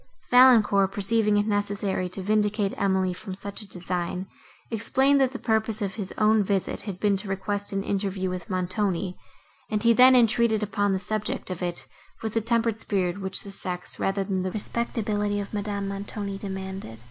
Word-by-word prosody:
Valancourt, 220 -6 +6
perceiving 210 +1 +2
it 205 - +2
necessary 205 -3 -1
to 185 +1 -7
vindicate 210 0 +1
Emily 190 -2 +1
from 185 +1 -7
such 200 +2 -6
a 210 - -9
design, 180 0 -3 0.5
explained, 265 +5 +2
that 260 -1 +3
the 260 - -5
purpose 220 -2 0
of 200 -3 -2
his 195 -3 -5
own 215 0 +4
visit 195 -1 -1
had 185 -2 -6
been 205 -1 +2
to 195 +1 -5
request 200 +1 -1
an 195 0 -1
interview 195 -1 -1
with 180 -1 -5
Montoni, 185 0 -1 0.5
and 215 0 -1
he 235 0 +6
then 255 +2 +7
entered 230 -2 +3
upon 205 -1 0
the - - +1
subject 210 0 -2
of 180 - -5
it, 175 -1 -3 0.4
with 220 -1 -3
the 225 - +1
tempered 230 0 0
spirit 190 -2 -1
which 190 0 +1
the 200 - -9
sex, 180 -2 -4
rather 195 0 0
than 190 -1 -1
the 185 - -1
respectability, 210 -1 -2
of 200 +1 -6
Madame 205 -1 -2
Montoni, 200 0 -5
demanded. 190 - -6
200 Hz, 180 wpm, -26 LUFS, 190-215 Hz, 0.5 s, then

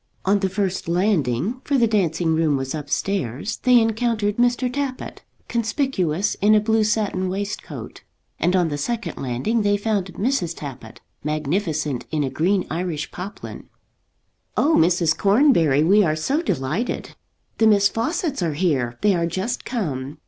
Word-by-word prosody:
On 200 +1 +3
the 190 -1 0
first 190 -2 -2
landing, 180 - 0
for 280 - +1
the 240 - +4
dancing 175 -6 +1
room 160 -3 +2
was 135 0 -3
upstairs, 145 - -2
they 250 -1 +5
encountered 225 -2 0
Mr. 245 +1 +2
Tappitt, 260 0 -4 0.3
conspicuous 210 - 0
in 210 +2 +5
a - - +6
blue 220 +1 +2
satin 210 -3 0
waistcoat; 200 +2 -5 0.4
and 180 +2 +2
on 175 -3 +2
the 145 -1 -3
second 215 0 -3
landing 135 - -1
they 205 0 +2
found 205 -2 -1
Mrs. 195 -8 -1
Tappitt, 135 -3 -9 0.2
magnificent 155 -2 -2
in 155 -2 0
a 135 - -2
green 180 +7 +1
Irish 165 -2 -3
poplin. 190 +4 -8 0.9
"Oh, 315 - +3
Mrs. 170 -1 +3
Cornbury, 195 - +4
we 200 +6 +5
are 155 -4 +1
so 270 - 0
delighted. 200 - -2 0.5
The 220 - +5
Miss 200 -2 +5
Fawcetts 290 - -2
are 165 -4 -1
here; 135 -9 0
they 205 0 +4
are 170 -2 0
just 190 +9 -3
come. 150 - -3
190 Hz, 150 wpm, -22 LUFS, 155-220 Hz, 0.9 s, a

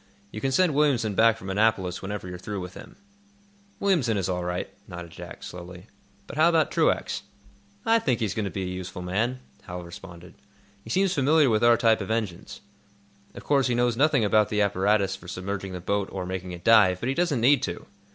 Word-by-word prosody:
You 110 - -7
can 135 - 0
send 175 +3 +3
Williamson 135 -7 +2
back 115 +2 +4
from 95 +1 -6
Annapolis 95 -3 +1
whenever 100 -1 -5
you're 90 0 -7
through 100 +2 -5
with 90 0 -7
him." - - -12 0.8
"Williamson 155 - +2
is 95 -2 -1
all 90 -1 -2
right," 90 0 -3 0.2
nodded 85 -1 -8
Jack, - - -10
slowly. 90 +1 -9 0.4
"But 145 - -9
how 160 +2 +5
about 165 -2 +2
Truax?" - - +1 0.6
"I 230 0 +4
think 125 - 0
he's 105 -5 -1
going 110 0 -2
to - - -2
be 95 0 -4
a - - -3
useful 90 0 -6
man," 115 +8 -1 0.2
Hal 90 0 -6
responded. 90 -1 -11 0.5
"He - - -12
seems 190 0 +2
familiar 145 -2 +3
with 110 +1 +1
our 120 0 +6
type 115 -1 +3
of - - -5
engines. 110 -6 -3 0.7
Of - - -9
course, 140 -3 +2
he 120 - 0
knows 120 -1 +2
nothing 135 -3 +3
about 105 0 +3
the 105 -1 +2
apparatus 100 0 +1
for 90 -3 -13
submerging 95 +1 -5
the 90 - -5
boat 100 +2 -1
or 95 -2 -4
making 95 0 -5
it 85 -1 -9
dive. 105 -5 +5
But 120 - -2
he - - +1
doesn't 170 -5 0
need 135 +5 +4
to. - - -4
105 Hz, 210 wpm, -26 LUFS, 90-125 Hz, 0.8 s, our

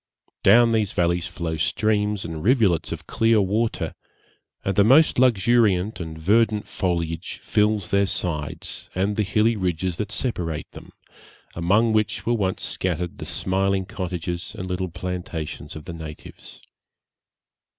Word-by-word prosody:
Down 115 +4 +6
these 110 -3 +1
valleys 85 0 +1
flow 80 -2 -4
streams 105 +3 0
and 80 -1 -5
rivulets 110 - +3
of - - -6
clear 115 -1 +3
water, 105 +4 0 0.7
and 95 - 0
the 100 - +5
most 135 +6 +5
luxuriant 110 -4 +3
and 80 -2 -6
verdant 105 +5 +2
foliage 85 -1 -2
fills 105 -2 +1
their 100 0 +3
sides 80 -4 -3
and 100 +3 0
the 110 - +1
hilly 105 +3 +2
ridges 90 -2 -1
that 105 0 -3
separate 85 - -2
them, - - -12 0.6
among 105 +7 +2
which 110 -1 0
were 120 - +2
once 95 -5 -1
scattered 90 -1 -3
the - - -6
smiling 95 0 0
cottages 90 +1 -4
and 95 - -4
little 90 0 -3
plantations 85 -4 -5
of 80 - -9
the 85 - -6
natives. 80 -2 -10
95 Hz, 140 wpm, -23 LUFS, 85-110 Hz, 0.7 s, Down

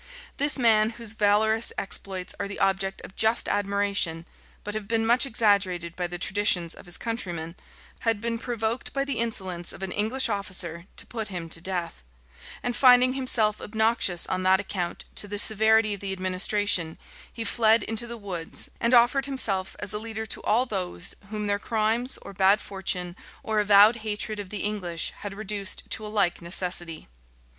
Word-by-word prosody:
This 290 +1 +2
man, 220 -3 +4
whose 230 -3 -6
valorous 220 +1 +2
exploits 190 -1 -4
are 200 - -2
the 200 - -7
object 195 0 0
of 190 - -11
just 220 +2 +3
admiration, 200 -5 0 0.4
but 210 - -5
have 215 -2 -5
been 225 0 +1
much 245 +4 +4
exaggerated 195 -7 +1
by 180 -1 -2
the 175 0 -4
traditions 180 -3 +2
of - - -14
his 175 - -2
countrymen, 175 -8 -4 0.4
had 225 -2 0
been 230 +1 -3
provoked 230 0 -3
by 275 0 -1
the 275 -5 -2
insolence 190 -7 0
of - - -8
an 190 - -3
English 225 +7 +1
officer 185 -5 -4
to - - -4
put 225 -3 -5
him 175 -4 -6
to 165 - 0
death; 175 - -3 0.6
and 245 -1 -1
finding 255 -1 +6
himself 235 -5 +1
obnoxious 220 -5 +1
on 185 - -2
that 190 +1 +4
account 180 -3 -4
to 205 - -1
the 205 0 -4
severity 220 +1 +4
of 200 - -6
the 195 0 -4
administration, 185 -2 +1 0.3
he 230 - -5
fled 225 +1 +3
into 225 +2 -2
the 235 0 -5
woods, 185 -6 -2
and 235 +2 +3
offered 255 +3 +4
himself 195 -9 0
as 205 0 -4
a 210 - -2
leader 220 0 -5
to 220 - -4
all 230 +4 +2
those 185 -6 -4 0.2
whom 210 -1 -4
their 205 0 +1
crimes, 225 +4 +1
or - - -10
bad 195 +2 +4
fortune, 180 -3 -4 0.3
or 220 -1 0
avowed 210 +2 +6
hatred 215 0 -3
of 200 -2 -6
the 205 0 -4
English, 180 -6 -3
had 200 -1 -6
reduced 205 -1 -3
to 220 - -3
a - - -5
like 200 -5 0
necessity. 175 -1 -3
205 Hz, 180 wpm, -26 LUFS, 185-225 Hz, 0.6 s, finding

